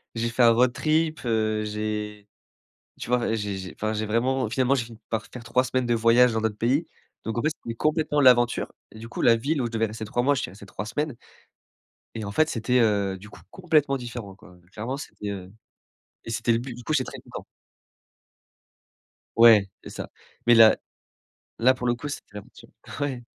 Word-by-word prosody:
J'ai 115 +1 -1
fait 115 +2 -1
un 120 - +8
road 125 +2 +3
trip, 155 0 0
heu, 110 -2 0
j'ai 105 -1 -4 0.7
tu - - -7
vois? 120 -2 +1
J 105 -3 -3
j'ai 95 -1 -8
enfin 110 +1 -2
j'ai 110 0 -2
vraiment 125 +2 0
finalement 130 +3 +2
j'ai 120 -4 -1
fini 115 -1 -13
par 110 -1 -2
faire 125 - -10
3 125 +2 +1
semaines 130 0 -1
de 120 - +1
voyage 115 +2 +5
dans 110 - -1
d'autres 110 -2 -1
pays. 135 +9 +1 0.4
Donc 110 +1 -3
en - - +1
fait, 155 - +3
c'était 115 - -5
complètement 150 +2 +1
l'aventure. 125 -2 +4 0.2
Du 115 +1 -9
coup, - - -5
la 115 - +6
ville 140 +6 -1
où - - -1
je - - -9
devais 115 -1 0
rester 110 +1 -7
3 120 +3 -1
mois, 145 +2 +3
j'y - - -2
suis - - -5
resté 100 +2 -13
3 100 +1 -6
semaines 145 +4 -3 1.0
et 110 -2 -4
en 100 - -5
fait, 155 +8 +2
c'était, 125 +2 +1
heu, 100 -3 +1
du 105 +3 -13
coup - - -14
complètement 155 -6 +1
différent 120 -5 -7
quoi. 90 -2 -17 0.2
Clairement, 120 +6 -4
c'était, 105 -7 -7
heu 95 -2 -7 0.7
et - - -7
c'était 115 - 0
le 115 - +1
but 125 0 -7
du 120 - -11
coup, 155 - -2
j'étais 130 -4 +1
très - - -9
content. - - -9 1.9
Ouais, 115 -4 +7
c'est - - -10
ça. - - -7 0.4
Mais 120 - +7
là 115 -1 +8 0.8
là 125 +3 +5
pour 125 -1 -4
le 120 - +2
coup, 135 +4 -7
c'était 145 -7 -8
l'aventure. 105 - -12 0.3
Ouais. 135 -4 -3
115 Hz, 210 wpm, -25 LUFS, 110-130 Hz, 1.9 s, un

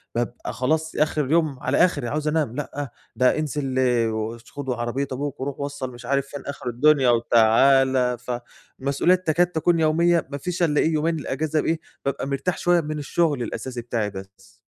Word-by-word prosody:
بابقى 120 0 -3
خلاص 160 +5 -1
آخر 150 -1 +1
اليوم 150 -2 +1
على - - 0
آخري، 145 -9 +2
عاوز 150 +3 -2
أنام، 150 -6 0
لأ 145 -2 -4 0.3
ده 125 +5 +3
انزل 140 -3 -2 0.3
وش 110 +1 -5
خد 140 -2 -6
عربية 125 +3 -2
أبوك 140 +1 -4
وروح 140 +1 -4
وصّل 140 -2 -4
مش 120 0 -11
عارف 140 +1 0
فين 145 0 -7
آخر 140 -3 -5
الدنيا 135 +1 +4
وتعالَ، 125 +2 +4
ف 125 +1 -6 0.5
مسؤوليات 165 +7 +1
تكاد 175 +3 +3
تكون 170 0 +1
يومية، 165 +1 +3
ما 140 - -3
فيش 175 +4 -2
إلا 150 -3 +2
إيه 160 - +1
يومين 160 +1 0
الإجازة 155 +3 -1
إيه 165 0 +1 0.3
بابقى 135 0 -2
مرتاح 140 +5 -1
شوية 175 -1 +3
من 150 0 -4
الشغل 145 -3 0
الأساسي 125 +2 -5
بتاعي 115 -3 -2
بس. 95 0 -12
140 Hz, 175 wpm, -23 LUFS, 125-155 Hz, 0.5 s, الدنيا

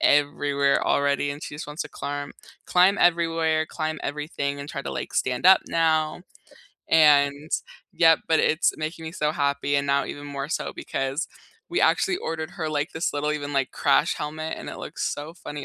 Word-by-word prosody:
everywhere 145 -1 +2
already 140 0 +1
and 145 +2 -7
she - - -7
just 150 - -6
wants 150 +2 -4
to - - -9
climb 145 0 -5 0.3
climb 185 +3 +4
everywhere, 165 -2 +2
climb 155 -1 -4
everything, 145 -1 -3
and 140 - -7
try 145 -4 -5
to, - - -5
like, - - -5
stand 130 +7 0
up 190 - +8
now, 160 0 +1 0.7
and 145 -1 +4 0.4
yep, 165 -2 +5
but 160 - +4
it's 155 - +2
making 160 +1 -5
me 160 - -6
so 150 -3 0
happy 140 -1 0
and 140 0 0
now 140 0 +2
even 145 0 -7
more 140 0 -5
so - - -3
because 135 +5 -3 0.4
we - - 0
actually 370 -2 +3
ordered 160 - -4
her 160 -3 -3
like 150 +2 -1
this 160 - -1
little 145 +1 -1
even, 145 -1 -4
like, 135 -2 0
crash - - +2
helmet 155 +2 -4
and - - -8
it - - -7
looks - - -3
so 150 +3 -8
funny 145 -5 -7
150 Hz, 190 wpm, -25 LUFS, 145-160 Hz, 0.7 s, up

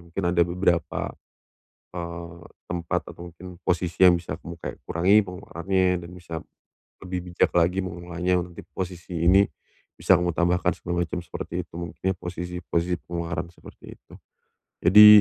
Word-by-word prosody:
mungkin 85 +3 -4
ada 85 - +5
beberapa, 85 0 +1 0.9
eee, 85 -1 -6 0.3
tempat 85 -2 -1
atau 85 +1 -9
mungkin 90 +2 -11
posisi 90 +1 +2
yang 90 - +6
bisa 80 -2 -5
kayak 85 -2 -7
kamu - - -46
kurangi 90 +5 +4
pengeluarannya 95 0 -1 0.2
dan 85 - -9
bisa, 85 -2 -9 0.7
lebih 90 -1 -5
bijak - - +3
lagi 90 +2 +3
mengolahnya 90 +1 -1
untuk 85 0 -9 0.2
posisi 90 -2 -4
ini, 95 +3 +7 0.5
bisa 95 - +5
kamu 90 0 0
tambahkan 90 +1 +2
segala 85 0 -1
macam 90 +2 -4
seperti 85 +1 -5
itu - - -50
mungkin 85 +2 -3
posisi 90 0 -5
posisi 85 +1 +1
pengeluaran 85 -1 -3
seperti - - -13
itu. - - -21 0.7
Jadi 105 +4 +10
90 Hz, 145 wpm, -25 LUFS, 85-90 Hz, 0.9 s, Jadi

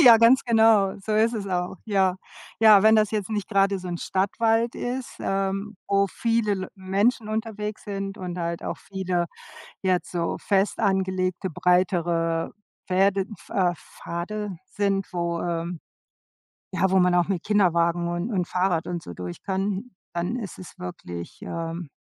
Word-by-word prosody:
Ja, 240 -6 +10
ganz 230 +3 +6
genau, 220 -4 +4
so 215 +3 -3
ist 220 +2 +3
es 205 -3 -3
auch, 180 -1 -2
ja. 190 -4 +2 0.4
Ja, 215 -3 +8
wenn 220 0 +7
das 215 -1 +3
jetzt 215 -1 -2
nicht 210 -2 -2
grade 195 -1 +2
so 180 - -7
'n 175 -1 -3
Stadtwald 225 +4 +1
ist, 250 +1 -4
ähm, 195 +1 -2
wo 200 0 +3
viele 225 0 0
Le 185 -1 -4
Menschen 205 +4 +1
unterwegs 215 -1 -4
sind 195 -1 -4
und 180 -1 -5
halt 170 0 -3
auch - - -4
viele 185 -3 -2 0.6
jetzt 185 -2 0
so 170 -2 -1
fest 195 0 +1
angelegte, 190 -2 0
breitere 170 -1 +1 0.4
Fäde 195 +1 +3 0.2
äh, 180 -3 +2
Pfade 185 +5 -6
sind, 195 -1 -1
wo 170 -1 -1
ähm, 170 0 -3 0.9
ja, 190 +1 +2
wo 190 - +5
man 180 -1 +4
auch 175 -1 +3
mit 185 -3 -1
Kinderwagen 170 -4 +2
und 175 +6 -2
und 180 -4 0
Fahrrad 180 -2 0
und 175 -1 -4
so 85 - -8
durch 90 0 -7
kann, 195 +4 -2 0.2
dann 175 +6 -1
ist 210 -7 -6
es 185 0 -11
wirklich, 90 - -7
ähm 165 0 -4
190 Hz, 160 wpm, -25 LUFS, 175-210 Hz, 0.9 s, Ja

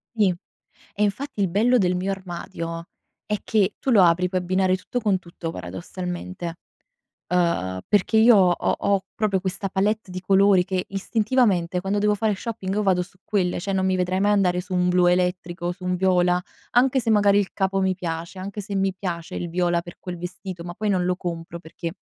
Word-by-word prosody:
Sì. 205 -4 +3 0.6
E 210 - -1
infatti 210 +3 -1
il 195 - +2
bello 235 +7 +3
del 180 -2 +2
mio 190 +2 -2
armadio 170 -2 -5 0.4
è 210 -1 -1
che 205 -2 +2
tu 265 - -1
lo 205 -6 +6
apri, 180 +1 +4
puoi 185 0 -1
abbinare 185 +1 +2
tutto 245 +6 -4
con 205 -4 +2
tutto, 170 -2 -7
paradossalmente. 170 - -6 0.7
Uhm, 170 - 0
perché 205 +2 +3
io 225 0 +7
ho 185 -2 +5
ho - - 0
ho 200 -2 +1
proprio 200 -4 0
questa 195 +1 -3
palette 200 +1 0
di 185 - -4
colori 195 0 +4
che 185 -1 -2
istintivamente 195 -4 +1
quando 195 +2 -1
devo 210 0 +3
fare 210 -1 0
shopping 205 -4 -4
io 210 - +1
vado 180 -2 +3
su 185 +1 -13
quelle, 185 -4 0
cioè 195 +1 -3
non 190 0 +1
mi 185 0 +2
vedrei 185 +1 0
mai 205 +1 +3
andare 180 -3 +2
su 185 0 -6
un 180 0 +2
blu 180 0 +4
elettrico, 180 -1 0
su 185 +1 -16
un 180 0 0
viola, 180 -1 +3 0.3
anche 260 +2 +4
se 225 - -1
magari 205 -1 +5
il 195 - -3
capo 195 0 0
mi 190 -1 +1
piace, 170 +1 -5
anche 200 +2 -5
se 200 0 -5
mi 195 -1 +1
piace 170 -4 -5
il 175 - -3
viola 175 0 +1
per 175 - -11
quel 180 -2 -7
vestito, 180 0 -7
ma 175 0 -6
poi 215 +1 -2
non 180 -2 +1
lo 180 0 0
compro 170 -1 -5
perché 165 +1 -7
185 Hz, 205 wpm, -24 LUFS, 180-200 Hz, 0.7 s, io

